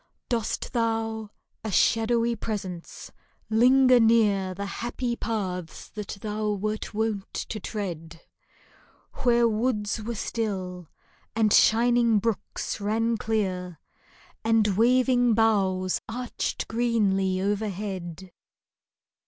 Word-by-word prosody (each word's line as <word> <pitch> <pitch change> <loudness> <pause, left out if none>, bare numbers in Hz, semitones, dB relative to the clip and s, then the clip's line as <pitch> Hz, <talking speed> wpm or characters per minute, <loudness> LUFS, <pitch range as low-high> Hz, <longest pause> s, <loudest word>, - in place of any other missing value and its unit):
Dost 230 -3 -2
thou, 225 -2 -1 0.3
a 220 - -3
shadowy 230 +3 +2
presence, 195 -6 -6 0.4
linger 255 +2 +6
near 210 -5 +3
The 200 +2 -4
happy 240 +4 -3
paths 185 -8 -4
that 210 -1 -7
thou 210 0 -1
wert 210 +2 -3
wont 215 -2 -2
to 215 - -4
tread, 170 -6 -5 1.0
Where 240 -1 +4
woods 220 -1 -1
were 230 +2 -4
still, 185 -6 -3 0.5
and 220 -2 +3
shining 235 0 +4
brooks 225 +1 -2
ran 225 +3 +1
clear, 185 -7 -2 0.6
And 225 -1 +3
waving 245 +1 +4
boughs 190 -4 +2
arched 245 +2 -3
greenly 205 -5 +1
overhead 190 -3 -3
215 Hz, 95 wpm, -26 LUFS, 195-230 Hz, 1.0 s, linger